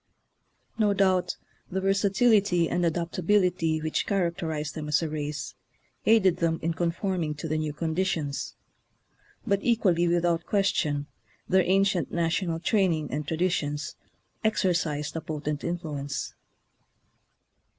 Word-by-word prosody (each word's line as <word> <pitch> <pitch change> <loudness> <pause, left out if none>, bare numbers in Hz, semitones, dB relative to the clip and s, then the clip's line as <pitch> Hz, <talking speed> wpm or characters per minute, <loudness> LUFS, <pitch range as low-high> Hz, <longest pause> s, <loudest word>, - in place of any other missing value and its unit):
No 205 -2 +3
doubt 190 -2 +2 0.3
the 190 - -1
versatility 195 -2 +3
and 175 - 0
adaptability 170 0 +1
which 155 0 -1
characterize 170 -6 -1
them 155 -1 -6
as 150 +2 +2
a 160 - -2
race 150 -1 -4 0.5
aided 205 -5 +5
them 165 -1 +1
in 165 +1 0
conforming 170 -1 -1
to 150 +2 -5
the 155 0 -1
new 155 -1 -2
condi 160 +4 -1
tions; 145 -6 -3 0.9
but, 200 -3 +2
equally 185 -8 +2
without 170 -1 +1
question, 155 -8 +1 0.4
their 190 +1 +4
ancient 195 -3 +2
national 170 0 0
training 170 -6 +1
and 150 +2 -3
traditions 155 -3 -1 0.5
exercised 175 -9 0
a 160 - -2
potent 150 -1 -4
influence. 145 -5 -4
170 Hz, 120 wpm, -27 LUFS, 155-190 Hz, 0.9 s, aided